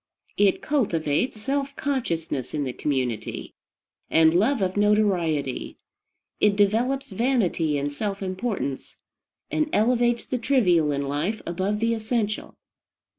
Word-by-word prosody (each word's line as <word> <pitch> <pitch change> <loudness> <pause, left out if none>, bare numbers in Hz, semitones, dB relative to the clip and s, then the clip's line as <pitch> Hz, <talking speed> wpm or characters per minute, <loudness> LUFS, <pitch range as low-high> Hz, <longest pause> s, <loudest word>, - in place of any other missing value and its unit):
It 200 -2 +3
cultivates 210 - 0
self 275 +4 -2
consciousness 165 - -2
in 150 - 0
the 130 -2 -3
community, 125 -7 -3 0.6
and 160 0 +5
love 225 +9 +3
of 185 0 -1
notoriety; 185 -10 +1 0.6
it 210 -1 +4
develops 225 +6 +1
vanity 190 - +1
and 145 +1 -2
self 200 +4 -3
importance, 185 - -3 0.5
and 310 0 0
elevates 240 +1 +2
the 255 - -2
trivial 180 - +3
in 140 0 -1
life 155 +10 -2
above 190 +4 -1
the 230 +1 +1
essential. 220 -1 -2
205 Hz, 120 wpm, -25 LUFS, 160-235 Hz, 0.6 s, and